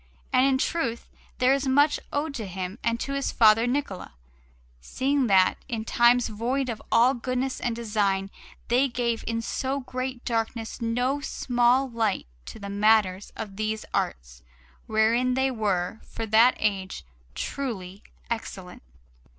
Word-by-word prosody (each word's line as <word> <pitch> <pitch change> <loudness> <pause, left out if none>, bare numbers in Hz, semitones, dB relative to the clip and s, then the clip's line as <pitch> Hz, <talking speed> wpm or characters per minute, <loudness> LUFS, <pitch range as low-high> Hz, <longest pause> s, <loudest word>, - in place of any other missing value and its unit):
And 255 +2 +5
in 270 -1 +3
truth 260 -5 -2 0.3
there 255 +1 +4
is 275 0 -1
much 285 +3 +4
owed 290 +1 -2
to 225 -7 -5
him 185 +3 -5
and 230 0 0
to 275 - -3
his 275 0 -1
father 225 +1 +5
Niccola, 245 -8 -3 0.7
seeing 265 - 0
that, 190 -3 +4
in 225 -4 -4
times 240 +1 +4
void 245 +5 -2
of 225 - -4
all 240 +3 +5
goodness 255 +1 -2
of 240 -1 -2
design, 205 -4 0 0.4
they 250 +4 +3
gave 240 -2 -2
in 230 0 -1
so 270 +3 -2
great 255 0 -5
darkness 225 0 -2
no 245 +5 0
small 250 0 +2
light 225 -5 -1 0.2
to - - -8
the 200 -2 -7
matters 205 -1 +2
of 205 -3 -7
these 215 0 -2
arts, - - -3 0.5
wherein 230 +4 +2
they 265 0 +1
were, 210 -3 -1
for 225 - -6
that 225 +3 +5
age, 195 - -2 0.3
truly 195 - -5 0.3
excellent. 195 -5 -6
230 Hz, 145 wpm, -26 LUFS, 210-255 Hz, 0.7 s, And